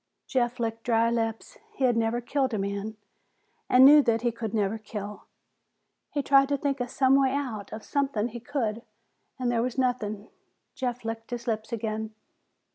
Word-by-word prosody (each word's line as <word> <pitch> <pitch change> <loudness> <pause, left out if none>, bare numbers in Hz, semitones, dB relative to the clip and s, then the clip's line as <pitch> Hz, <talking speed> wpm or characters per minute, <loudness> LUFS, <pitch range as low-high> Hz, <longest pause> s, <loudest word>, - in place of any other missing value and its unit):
Jeff 245 -2 0
licked 230 -1 -2
dry 230 -1 +2
lips. 225 -1 -3 0.2
He 270 - -3
had 245 -2 +4
never 230 +1 0
killed 260 -1 0
a - - -1
man 200 +2 -3 0.7
and 255 +1 +8
knew 295 +2 +9
that 230 -4 +1
he 240 - +2
could 225 -2 -5
never 215 0 0
kill. 210 -1 -7 0.8
He 285 - -2
tried 275 0 +5
to 285 - +1
think 275 0 -1
of 245 0 -2
some 265 0 +3
way 265 -1 +3
out, 240 -8 -4
of 220 - -7
something 270 -6 0
he 240 +1 -7
could 240 -3 -1
do, - - -11 0.6
and 250 -2 0
there 230 -1 +1
was 250 +1 -2
nothing. 220 -5 -1 0.4
Jeff 245 -2 -3
licked 225 0 -5
his 240 -1 -5
lips 220 -1 -2
again. 220 -1 -3
235 Hz, 185 wpm, -27 LUFS, 220-260 Hz, 0.8 s, knew